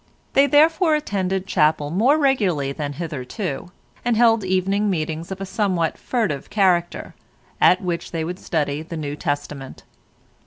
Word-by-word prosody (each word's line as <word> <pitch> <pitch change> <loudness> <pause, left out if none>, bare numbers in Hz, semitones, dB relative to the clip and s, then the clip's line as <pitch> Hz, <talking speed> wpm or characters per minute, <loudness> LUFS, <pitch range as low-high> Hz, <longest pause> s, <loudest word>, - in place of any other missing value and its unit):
They 275 +1 +5
therefore 315 +2 +4
attended 190 -9 -2
chapel 150 -4 +1
more 240 - +3
regularly 200 - +1
than 145 0 -4
hitherto, 160 - -5 0.3
and 240 -2 +1
held 225 -2 +4
evening 190 +2 +1
meetings 160 0 -3
of 190 - -5
a 195 - -4
somewhat 190 -4 0
furtive 210 - -2
character, 180 -4 +1 0.5
at 180 +2 +5
which 175 -2 -3
they 165 -2 -3
would 180 +3 -5
study 150 -3 -1
the 165 +1 -7
New 145 -2 -4
Testament. 145 -2 -5
180 Hz, 145 wpm, -22 LUFS, 155-210 Hz, 0.5 s, They